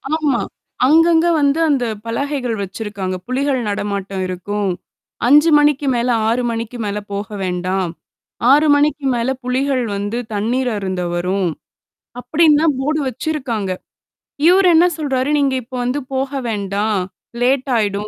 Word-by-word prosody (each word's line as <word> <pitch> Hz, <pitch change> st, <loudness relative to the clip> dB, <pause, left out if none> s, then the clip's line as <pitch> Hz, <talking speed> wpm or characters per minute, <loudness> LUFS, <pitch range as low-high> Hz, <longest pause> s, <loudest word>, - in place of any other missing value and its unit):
ஆமா. 290 Hz, -6 st, +1 dB, 0.5 s
அங்கங்க 330 Hz, +2 st, +5 dB
வந்து 285 Hz, +2 st, +2 dB
அந்த 265 Hz, -4 st, +1 dB, 0.2 s
பலகைகள் 250 Hz, 0 st, -2 dB
வச்சிருக்காங்க. 195 Hz, -1 st, -4 dB
புலிகள் 265 Hz, +1 st, 0 dB
நடமாட்டம் 200 Hz, -1 st, -3 dB
இருக்கும். 195 Hz, +2 st, -3 dB, 0.6 s
5 295 Hz, +5 st, +6 dB
மணிக்கு 295 Hz, -1 st, +2 dB
மேல 240 Hz, +1 st, 0 dB, 0.2 s
6 240 Hz, +2 st, +1 dB
மணிக்கு 230 Hz, +1 st, -4 dB
மேல 205 Hz, 0 st, -2 dB, 0.2 s
போக 200 Hz, 0 st, -3 dB, 0.2 s
வேண்டாம். 180 Hz, 0 st, -1 dB, 0.6 s
6 300 Hz, +2 st, +5 dB
மணிக்கு 290 Hz, -1 st, +1 dB
மேல 235 Hz, +2 st, -1 dB
புலிகள் 255 Hz, 0 st, 0 dB
வந்து 205 Hz, +4 st, -3 dB, 0.2 s
தண்ணீர் 245 Hz, +5 st, 0 dB
அருந்த 190 Hz, -2 st, -3 dB
வரும். 180 Hz, +1 st, 0 dB, 0.7 s
அப்பிடின்லாம் 310 Hz, +2 st, +3 dB, 0.2 s
தான் -, -, -7 dB
போர்டு 305 Hz, +3 st, 0 dB
வச்சிருக்காங்க. 255 Hz, -, -3 dB, 0.8 s
இவரு 370 Hz, +1 st, +5 dB
என்ன 340 Hz, +2 st, +6 dB
சொல்றாரு, 270 Hz, -2 st, -1 dB
"நீங்க 275 Hz, -2 st, +2 dB
இப்ப 255 Hz, +2 st, -10 dB
வந்து 250 Hz, +4 st, -1 dB
போக 265 Hz, +1 st, -1 dB, 0.2 s
வேண்டாம். 205 Hz, 0 st, -1 dB, 0.4 s
லேட் 265 Hz, +2 st, +1 dB
ஆயிடும். 205 Hz, -1 st, -1 dB
250 Hz, 130 wpm, -18 LUFS, 205-285 Hz, 0.8 s, 5